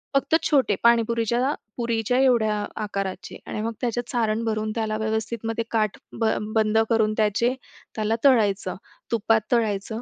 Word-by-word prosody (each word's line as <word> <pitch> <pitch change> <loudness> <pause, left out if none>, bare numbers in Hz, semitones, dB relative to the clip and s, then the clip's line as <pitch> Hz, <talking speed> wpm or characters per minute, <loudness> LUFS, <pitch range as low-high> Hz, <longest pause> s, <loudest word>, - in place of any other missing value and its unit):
फक्त 275 +3 +3
छोटे 265 -10 +2
पाणीपुरीच्या 235 +3 +2 0.2
पुरीच्या 235 0 0
एवढ्या 235 -5 +3 0.3
आकाराचे 195 -2 -4
आणि 215 - -4
मग 230 +1 -2
त्याच्यात 240 0 -2
सारण 225 -2 0
भरून, 215 -1 -1
त्याला 220 -1 -1
व्यवस्थित 220 +1 -2
मग 225 0 -3
काठ 215 -3 0 0.2
ब 225 - +1 0.3
बंद 220 0 +2
करून 220 -2 +2
त्याचे 220 +3 +2 0.4
त्याला 215 0 0
तळायचं, 215 -7 +3 0.4
तुपात 225 0 +2
तळायचं. 220 -1 0
225 Hz, 140 wpm, -24 LUFS, 215-235 Hz, 0.4 s, फक्त